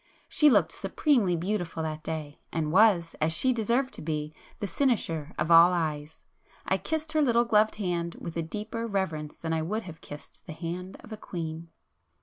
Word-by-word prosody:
She 300 - +5
looked - - +4
supremely 235 - +1
beautiful 175 -2 -2
that 155 -1 -4
day, 155 -2 -5
and 155 -2 -1
was, 185 -4 +4
as 155 +1 +2
she 255 +10 +3
deserved 240 +4 0
to - - -7
be, 150 -1 -3 0.3
the - - -2
cynosure 170 - 0
of 155 +2 0
all 170 +2 +9
eyes. 155 -2 -3 0.4
I - - +1
kissed 315 -1 -3
her 310 -1 +2
little 240 -4 +3
gloved 215 -1 +3
hand 175 -4 -2
with 170 - -7
a 165 - 0
deeper 215 +7 -4
reverence 165 -8 -2
than 165 0 -3
I 160 - 0
would 215 +8 -2
have 165 -4 -10
kissed 145 0 -11
the 165 - -6
hand 175 +3 -6
of - - -14
a - - -6
queen. 165 -4 -6
170 Hz, 185 wpm, -28 LUFS, 160-220 Hz, 0.4 s, all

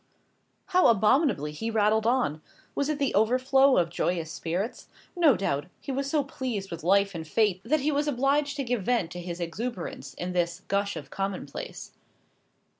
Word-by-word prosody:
How 365 -1 +5
abominably 220 - +3
he 225 +10 -4
rattled 220 0 +2
on. 235 - +1 0.3
Was 280 +1 -1
it 305 - 0
the 280 -2 0
overflow 260 +5 +4
of 170 -2 +2
joyous 170 -2 -1
spirits? 180 +10 -3 0.3
No 320 - +5
doubt. 145 -7 -1
He 280 - -6
was 275 +1 -2
so 295 -1 +2
pleased 245 -8 -4
with 170 -1 -6
life 200 +3 +3
and 160 -2 -6
fate, 205 0 +1
that 295 +6 +1
he 300 +3 +1
was 290 +1 0
obliged 285 +2 +1
to 280 - -2
give 245 -3 -1
vent 195 -5 0
to 180 - -6
his 175 0 -6
exuberance 175 - -5
in 180 +1 -4
this 175 0 -1
gush 200 0 0
of 140 -3 -8
commonplace. 195 -7 -5
215 Hz, 175 wpm, -27 LUFS, 175-270 Hz, 0.3 s, How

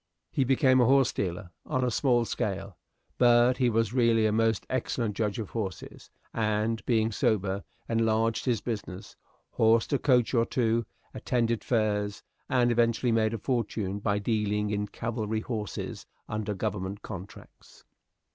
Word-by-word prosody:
He 135 - +1
became 130 0 +4
a - - +5
horse 135 0 +4
dealer 90 -1 -3
on 130 - -1
a 125 - +1
small 120 -1 +2
scale: 100 -3 -3 0.4
but 120 0 +5
he 125 -2 +2
was 115 -1 0
really 115 -3 +3
a 110 - +3
most 110 -1 +1
excellent 115 -4 -2
judge 105 -1 -1
of 110 -4 -5
horses, 100 -6 -6 0.2
and, 110 0 0
being 110 -2 +2
sober, 100 -2 0 0.2
enlarged 115 0 +1
his 120 -5 +1
business; 105 -5 -6 0.4
horsed 115 +4 +3
a 140 - +2
coach 125 -4 +3
or 115 -2 +4
two; 115 -2 0 0.3
attended 115 -2 -1
fairs, 105 -3 0 0.3
and 125 -2 +3
eventually 120 +1 +2
made 110 0 +2
a - - -3
fortune 110 -5 -2
by 100 0 0
dealing 105 -1 0
in 105 0 -1
cavalry 110 0 -3
horses 110 -4 -5 0.2
under 105 -1 -3
government 100 0 -4
contracts. 95 -3 -11
110 Hz, 145 wpm, -28 LUFS, 105-120 Hz, 0.4 s, a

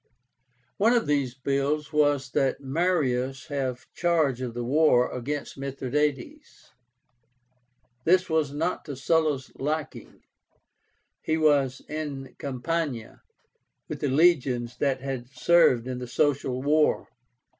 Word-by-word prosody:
One 225 +4 +4
of 240 - +2
these 140 -4 0
bills 140 +3 -1
was 145 -3 +2
that 135 -2 +1
Marius 135 -4 0
have 130 -3 -3
charge 160 -7 +1
of 120 -2 -4
the 120 - -3
war 130 -1 +3
against 140 +3 -5
Mithradátes. 145 - -3 1.3
This 180 +4 +3
was 160 -3 0
not 160 +5 -2
to 145 - -6
Sulla's 145 -1 0
liking. 150 +2 -4 1.0
He 160 - 0
was 140 -4 +2
in 145 -4 -5
Campania 140 -2 -3 0.7
with - - -6
the - - -1
legions 130 -6 +2
that 135 -2 0
had 130 -3 -5
served 130 -2 +3
in 125 -1 -4
the 125 - -6
Social 135 -1 0
War. 150 +2 +2
140 Hz, 115 wpm, -26 LUFS, 130-155 Hz, 1.3 s, One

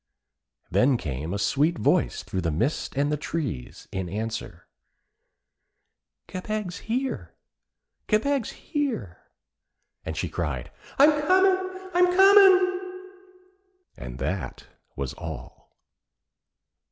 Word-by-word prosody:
Then 130 0 +4
came 75 - -4
a - - -3
little - - -1
sweet 145 +11 +1
voice - - +1
through 95 - -3
the 85 - 0
mist 115 - -1
and 145 +1 +2
the 150 - 0
trees 140 - -5
in 95 -2 -3
answer: 105 -3 -5 1.6
'Kebeg's 195 0 -4
here! 260 +3 -2 0.7
Kebeg's 255 +3 +1
here!' 260 - -3 0.8
And 80 -1 -5
she 90 - -1
cried: 75 -7 -4 0.3
'I'm 295 +1 +6
comin'! 375 +2 +2
I'm 355 +1 +5
comin'!' 375 -1 +5 0.9
And - - -8
that - - -4 0.3
was - - -4
all. - - -9
180 Hz, 105 wpm, -26 LUFS, -, 1.6 s, I'm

